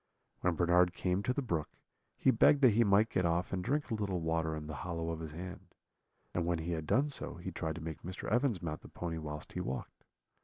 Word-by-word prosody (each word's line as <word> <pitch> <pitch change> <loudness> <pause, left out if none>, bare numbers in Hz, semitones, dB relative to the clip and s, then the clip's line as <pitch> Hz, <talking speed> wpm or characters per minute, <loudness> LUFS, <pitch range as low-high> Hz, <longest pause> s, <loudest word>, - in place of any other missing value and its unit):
When 90 -2 +1
Bernard 90 +1 +4
came 90 +1 0
to 100 - 0
the 140 +2 -1
brook, 85 -10 -1 0.5
he - - +4
begged 145 - +5
that 125 - +8
he 115 +3 +5
might 105 +1 +4
get 90 - +1
off 85 +2 +1
and 90 -1 -1
drink 145 +4 0
a - - +2
little 100 -4 -1
water 80 -1 0
in 75 -1 -5
the 75 -1 -6
hollow 85 -2 -2
of 80 - -4
his 80 -2 -6
hand; 90 +2 -8 0.6
and 85 - 0
when 85 0 +1
he 80 +2 -3
had 80 -2 -3
done 145 +3 +3
so, 140 - -2
he 90 +2 -6
tried 80 -2 -3
to 85 - -7
make 80 -1 -5
Mr. 90 +2 -6
Evans 120 -5 +1
mount 80 -2 -3
the - - -12
pony 85 -2 -4
whilst 75 -1 -6
he - - -3
walked. 65 +2 -5
85 Hz, 240 wpm, -33 LUFS, 80-100 Hz, 0.6 s, that